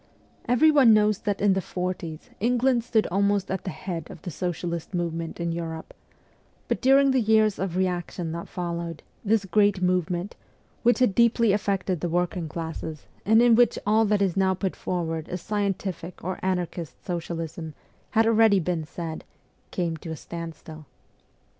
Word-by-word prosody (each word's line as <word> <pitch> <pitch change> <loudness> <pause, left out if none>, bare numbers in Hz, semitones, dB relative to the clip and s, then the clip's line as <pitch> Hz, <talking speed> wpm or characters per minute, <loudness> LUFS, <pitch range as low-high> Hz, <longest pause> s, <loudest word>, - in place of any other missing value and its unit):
Everyone 260 -2 +6
knows 210 -1 +3
that 205 -2 -2
in 200 -1 +4
the 190 - 0
forties 180 -3 -5
England 245 +2 +2
stood 225 -2 +2
almost 200 0 +1
at 190 - -3
the - - -2
head 170 -4 -5
of - - -10
the 175 - -5
socialist 175 +1 -4
movement 165 -1 -3
in 170 0 -1
Europe; 165 -1 -5 0.7
but - - -1
during 275 +1 +5
the 265 - +3
years 215 -1 +3
of 185 -2 -2
reaction 175 -2 -2
that 170 +1 -5
followed, 170 -2 -4 0.2
this 215 -1 +2
great 200 +1 +3
movement, 180 +1 0 0.5
which 240 0 +4
had 250 -6 +3
deeply 235 0 +4
affected 195 -3 0
the 175 - -2
working 175 -1 -1
classes, 160 -1 -6 0.2
and 220 +2 +6
in 240 -1 +6
which 240 0 +4
all 215 +2 +4
that 205 -1 +2
is 185 -4 0
now 190 -1 +2
put 190 0 -2
forward 165 -3 -3
as 180 - -3
scientific 195 -4 -3
or 185 +2 -3
anarchist 180 -3 -3
socialism 165 -2 -4 0.3
had 225 +1 +3
already 225 -3 +5
been 170 -2 -1
said, 160 +1 -6 0.5
came 170 -3 -2
to 160 - -9
a 160 - -3
standstill. 160 -2 -8
185 Hz, 160 wpm, -26 LUFS, 170-210 Hz, 0.7 s, Everyone